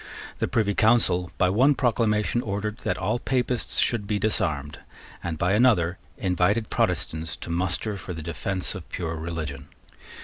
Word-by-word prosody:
The -, -, +1 dB
Privy 110 Hz, -4 st, +1 dB
Council 100 Hz, -6 st, +3 dB
by 90 Hz, -, +3 dB
one 130 Hz, +8 st, +4 dB
proclamation 115 Hz, -2 st, +1 dB
ordered 105 Hz, +2 st, -3 dB
that -, -, -2 dB
all 120 Hz, -, -1 dB
Papists 125 Hz, -2 st, 0 dB
should 110 Hz, -4 st, +2 dB
be 105 Hz, -, 0 dB
disarmed, 75 Hz, -9 st, -1 dB, 0.4 s
and 85 Hz, -2 st, -3 dB
by 90 Hz, +4 st, +1 dB
another 100 Hz, -7 st, +3 dB, 0.2 s
invited 95 Hz, +4 st, +1 dB
Protestants 80 Hz, 0 st, -1 dB
to 85 Hz, -, -7 dB
muster 95 Hz, +4 st, -1 dB
for 95 Hz, -, -7 dB
the 80 Hz, -2 st, -6 dB
defence 85 Hz, +4 st, -2 dB
of 95 Hz, -5 st, -9 dB
pure 80 Hz, -2 st, -3 dB
religion. 80 Hz, -4 st, -5 dB
95 Hz, 150 wpm, -25 LUFS, 85-110 Hz, 0.4 s, one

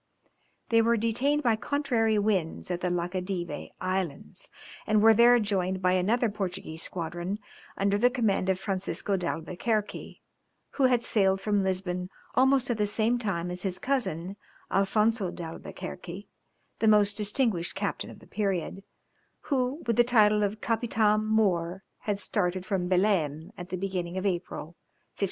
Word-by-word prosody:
They 230 Hz, -1 st, +5 dB
were 230 Hz, +1 st, +3 dB
detained 255 Hz, +7 st, +1 dB
by 230 Hz, -3 st, +3 dB
contrary 235 Hz, -5 st, +1 dB
winds 195 Hz, -5 st, 0 dB
at 175 Hz, 0 st, -2 dB
the 180 Hz, -, 0 dB
Laccadive 180 Hz, +1 st, -3 dB
Islands, 185 Hz, -, -3 dB, 0.4 s
and 215 Hz, -1 st, +4 dB
were 220 Hz, +1 st, +7 dB
there 240 Hz, +2 st, +6 dB
joined 190 Hz, -3 st, 0 dB
by 180 Hz, 0 st, +2 dB
another 210 Hz, +7 st, +2 dB
Portuguese 185 Hz, -6 st, -4 dB
squadron 175 Hz, +3 st, -4 dB, 0.4 s
under 200 Hz, +1 st, +1 dB
the 245 Hz, +3 st, +5 dB
command 220 Hz, -7 st, 0 dB
of 185 Hz, -1 st, +1 dB
Francisco 195 Hz, +1 st, -2 dB
d'Albuquerque, 185 Hz, +5 st, -3 dB, 0.5 s
who 275 Hz, -, +2 dB
had 245 Hz, -2 st, +3 dB
sailed 195 Hz, -4 st, +2 dB
from 205 Hz, -1 st, +1 dB
Lisbon 180 Hz, -1 st, -2 dB, 0.2 s
almost 265 Hz, 0 st, +3 dB
at 225 Hz, -, -2 dB
the 210 Hz, -, +2 dB
same 225 Hz, +3 st, +1 dB
time 180 Hz, -6 st, -1 dB
as 180 Hz, 0 st, -4 dB
his 185 Hz, -2 st, -2 dB
cousin 195 Hz, -, -2 dB, 0.3 s
Alfonzo 205 Hz, +1 st, +2 dB
d'Albuquerque 180 Hz, +3 st, -7 dB, 0.5 s
the 220 Hz, -, +2 dB
most 210 Hz, -1 st, +5 dB
distinguished 210 Hz, -4 st, 0 dB
captain 200 Hz, 0 st, -3 dB
of -, -, -11 dB
the -, -, -17 dB
period, 195 Hz, -2 st, -2 dB, 0.7 s
who 260 Hz, +4 st, 0 dB
with 230 Hz, -2 st, 0 dB
the 240 Hz, -, +7 dB
title 215 Hz, -3 st, +4 dB
of 210 Hz, +1 st, -1 dB
Capitam 220 Hz, -2 st, +1 dB
mõr 190 Hz, -4 st, +1 dB, 0.2 s
had 205 Hz, -2 st, -2 dB
started 185 Hz, -3 st, 0 dB
from 190 Hz, -3 st, -1 dB
Belem 180 Hz, -4 st, +1 dB
at 180 Hz, -2 st, -8 dB
the 185 Hz, -, -3 dB
beginning 180 Hz, -2 st, -3 dB
of 190 Hz, -, -2 dB
April, 180 Hz, -2 st, -2 dB
1503. -, -, -20 dB
200 Hz, 150 wpm, -28 LUFS, 180-225 Hz, 0.7 s, were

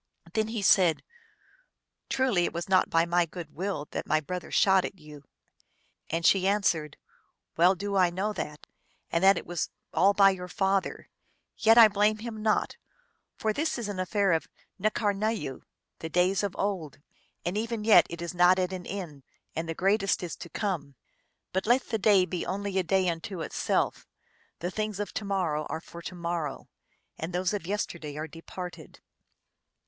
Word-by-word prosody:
Then 220 Hz, -1 st, +1 dB
he 220 Hz, -2 st, -3 dB
said, 180 Hz, -4 st, +4 dB, 0.5 s
" -, -, -44 dB
Truly 250 Hz, -10 st, +2 dB
it -, -, -3 dB
was 170 Hz, 0 st, -4 dB
not 190 Hz, -1 st, +3 dB
by 165 Hz, 0 st, +3 dB
my 175 Hz, 0 st, +2 dB
good 165 Hz, -2 st, -9 dB
will 180 Hz, -4 st, -3 dB
that -, -, -4 dB
my 155 Hz, -, +3 dB
brother 180 Hz, +4 st, -6 dB
shot 190 Hz, -3 st, +4 dB
at -, -, -5 dB
you." 150 Hz, -3 st, -13 dB, 0.8 s
And 165 Hz, +1 st, -1 dB
she 190 Hz, -1 st, +4 dB
an 205 Hz, +1 st, +2 dB
swered, 155 Hz, -5 st, 0 dB, 0.3 s
" -, -, -49 dB
Well 180 Hz, +3 st, +5 dB
do 200 Hz, +1 st, -3 dB
I 185 Hz, -2 st, +4 dB
know 195 Hz, +5 st, -2 dB
that, 150 Hz, -6 st, -6 dB, 0.5 s
and 170 Hz, +2 st, +1 dB
that 195 Hz, +1 st, +7 dB
it -, -, -5 dB
was 175 Hz, -1 st, -3 dB, 0.2 s
all 200 Hz, +2 st, +4 dB
by 195 Hz, -1 st, +7 dB
your 180 Hz, -1 st, -6 dB
father; 195 Hz, +1 st, -1 dB, 0.5 s
yet 225 Hz, +1 st, +5 dB
I 230 Hz, -2 st, +11 dB
blame 210 Hz, +1 st, +2 dB
him 220 Hz, -1 st, -7 dB
not, 215 Hz, 0 st, +1 dB, 0.6 s
for 215 Hz, -1 st, 0 dB
this 310 Hz, +5 st, -1 dB
is 235 Hz, -3 st, -4 dB
an 200 Hz, -3 st, -4 dB
affair 195 Hz, +1 st, +1 dB
of 165 Hz, -1 st, +1 dB, 0.4 s
N 215 Hz, -, +5 dB
karnayoo, 205 Hz, -, -1 dB, 0.4 s
the 160 Hz, -, -5 dB
days 180 Hz, +4 st, +2 dB
of 200 Hz, -2 st, -3 dB
old; 185 Hz, -8 st, -2 dB, 0.5 s
and 175 Hz, +3 st, -1 dB
even 225 Hz, 0 st, -2 dB
yet 220 Hz, 0 st, +7 dB
it 170 Hz, 0 st, -6 dB
is 170 Hz, -, -4 dB
not 180 Hz, +1 st, +5 dB
at 185 Hz, 0 st, -1 dB
an 180 Hz, -1 st, -6 dB
end, 175 Hz, -8 st, -6 dB, 0.3 s
and 165 Hz, +1 st, -3 dB
the 165 Hz, -, -3 dB
greatest 195 Hz, +1 st, +1 dB
is 170 Hz, -, -4 dB
to 170 Hz, -, -9 dB
come. 165 Hz, -9 st, -3 dB, 0.6 s
But 190 Hz, +3 st, -1 dB
let 245 Hz, +3 st, +3 dB
the 225 Hz, -, -1 dB
day 195 Hz, -2 st, +5 dB
be 180 Hz, -1 st, -3 dB
only 195 Hz, 0 st, -2 dB
a -, -, +1 dB
day 185 Hz, +2 st, +2 dB
unto 170 Hz, +2 st, -3 dB
itself; -, -, -1 dB, 0.5 s
the 175 Hz, +2 st, -2 dB
things 215 Hz, 0 st, -3 dB
of 205 Hz, -, -4 dB
to 215 Hz, -, -4 dB
morrow 175 Hz, -7 st, -1 dB
are 160 Hz, -, -3 dB
for 170 Hz, +1 st, -11 dB
to 180 Hz, -, -7 dB
morrow, 170 Hz, -4 st, -4 dB, 0.5 s
and 165 Hz, +2 st, -4 dB
those 180 Hz, +2 st, 0 dB
of 195 Hz, -5 st, -4 dB
yesterday 170 Hz, -7 st, -3 dB
are 155 Hz, +1 st, -4 dB
departed." 170 Hz, +1 st, -9 dB
185 Hz, 185 wpm, -28 LUFS, 170-205 Hz, 0.8 s, I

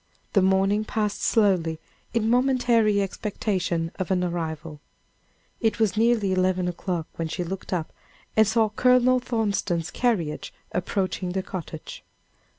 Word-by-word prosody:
The 195 Hz, -, +5 dB
morning 195 Hz, +2 st, +3 dB
passed 215 Hz, -1 st, -2 dB
slowly, 180 Hz, -8 st, +2 dB, 0.3 s
in 230 Hz, -2 st, 0 dB
momentary 240 Hz, -4 st, +3 dB
expectation 185 Hz, -4 st, -2 dB
of 185 Hz, -, -2 dB
an 185 Hz, -1 st, +1 dB
arrival. 160 Hz, -3 st, -4 dB, 0.8 s
It 220 Hz, -3 st, +1 dB
was 220 Hz, -3 st, +2 dB
near 235 Hz, +2 st, +4 dB
eleven 185 Hz, -1 st, +1 dB
o'clock 175 Hz, -1 st, -3 dB
when 165 Hz, -, -2 dB
she 175 Hz, +3 st, -3 dB
looked 185 Hz, +2 st, -6 dB
up 170 Hz, -4 st, -2 dB, 0.4 s
and 220 Hz, -1 st, +5 dB
saw 220 Hz, 0 st, +3 dB
Colonel 250 Hz, +3 st, +4 dB
Thornton's 200 Hz, -8 st, -1 dB
carriage 190 Hz, -12 st, -1 dB, 0.2 s
approaching 185 Hz, 0 st, -1 dB
the 190 Hz, 0 st, -1 dB
cottage. 170 Hz, -4 st, -7 dB
195 Hz, 130 wpm, -25 LUFS, 175-220 Hz, 0.8 s, The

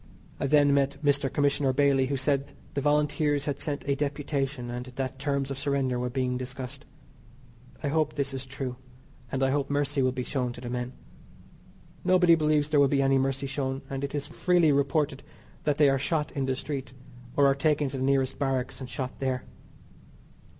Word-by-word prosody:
I -, -, 0 dB
then 145 Hz, 0 st, +5 dB
met 140 Hz, 0 st, +2 dB
Mr. 140 Hz, -2 st, +2 dB
Commissioner 140 Hz, -2 st, +2 dB
Bailey 135 Hz, -1 st, +3 dB
who 140 Hz, 0 st, -1 dB
said 140 Hz, +1 st, 0 dB, 0.2 s
the 140 Hz, -, -1 dB
Volunteers 150 Hz, 0 st, +2 dB
had 140 Hz, -2 st, -2 dB
sent 145 Hz, -2 st, -3 dB
a 140 Hz, -, +3 dB
deputation, 140 Hz, -3 st, -2 dB
and 125 Hz, +1 st, -5 dB
that 130 Hz, +1 st, -4 dB
terms 140 Hz, -1 st, -1 dB
of 135 Hz, -, -4 dB
surrender 140 Hz, -3 st, 0 dB
were 125 Hz, 0 st, -1 dB
being 125 Hz, 0 st, -1 dB
discussed. 130 Hz, +2 st, -6 dB, 1.0 s
I 145 Hz, -, 0 dB
hope 155 Hz, 0 st, +1 dB
this 140 Hz, -2 st, -1 dB
is 135 Hz, 0 st, -5 dB
true, 130 Hz, -1 st, -5 dB, 0.5 s
and 135 Hz, 0 st, 0 dB
I 135 Hz, -, +3 dB
hope 140 Hz, -1 st, 0 dB
mercy 145 Hz, 0 st, +1 dB
will 130 Hz, 0 st, +3 dB
be 125 Hz, 0 st, -3 dB
shown 125 Hz, -2 st, -2 dB
to 120 Hz, -, -10 dB
the 120 Hz, -1 st, -5 dB
men. 125 Hz, +1 st, -3 dB, 1.1 s
Nobody 180 Hz, -2 st, +5 dB
believes 155 Hz, -2 st, +2 dB
there 150 Hz, -, +4 dB
will 140 Hz, -, +6 dB
be 140 Hz, 0 st, +2 dB
any 135 Hz, 0 st, +4 dB
mercy 135 Hz, +1 st, -1 dB
shown, 135 Hz, 0 st, -3 dB
and 135 Hz, 0 st, -3 dB
it 140 Hz, +1 st, -3 dB
is 145 Hz, -, -2 dB
freely 175 Hz, -4 st, +3 dB
reported 140 Hz, 0 st, +1 dB, 0.4 s
that 150 Hz, -1 st, +2 dB
they 150 Hz, -, +6 dB
are 135 Hz, -1 st, +3 dB
shot 150 Hz, +2 st, 0 dB
in 135 Hz, -2 st, -2 dB
the 130 Hz, -, +1 dB
street, 135 Hz, -2 st, -5 dB, 0.4 s
or 140 Hz, -, +5 dB
are 135 Hz, -, +5 dB
taken 145 Hz, +1 st, +1 dB
to 135 Hz, -, -5 dB
the 130 Hz, -, -2 dB
nearest 135 Hz, -1 st, +1 dB
barracks 135 Hz, -2 st, -1 dB
and 130 Hz, -, -6 dB
shot 130 Hz, -3 st, -5 dB
there. 130 Hz, -2 st, -1 dB
140 Hz, 195 wpm, -28 LUFS, 130-145 Hz, 1.1 s, will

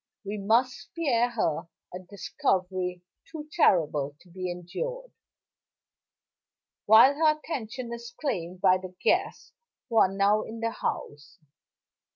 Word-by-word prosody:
We 205 Hz, +1 st, -4 dB
must 230 Hz, +6 st, +2 dB
spare 245 Hz, 0 st, -1 dB
her 170 Hz, -8 st, -1 dB, 0.3 s
a 180 Hz, -, -5 dB
discovery 185 Hz, -1 st, -2 dB, 0.3 s
too 305 Hz, -2 st, -7 dB
terrible 150 Hz, -, +2 dB
to 180 Hz, -, -20 dB
be 185 Hz, 0 st, -4 dB
endured, -, -, -5 dB, 1.8 s
while 225 Hz, +6 st, +8 dB
her 305 Hz, +1 st, +3 dB
attention 250 Hz, -5 st, -5 dB
is 235 Hz, 0 st, -8 dB
claimed 180 Hz, -, -3 dB
by 185 Hz, 0 st, +5 dB
the 185 Hz, -1 st, -10 dB
guests 370 Hz, +3 st, 0 dB, 0.4 s
who 230 Hz, -, -1 dB
are 190 Hz, -, +5 dB
now 200 Hz, +2 st, +2 dB
in 225 Hz, +1 st, -8 dB
the 230 Hz, 0 st, -1 dB
house. 145 Hz, -8 st, -5 dB
210 Hz, 125 wpm, -27 LUFS, 180-250 Hz, 1.8 s, while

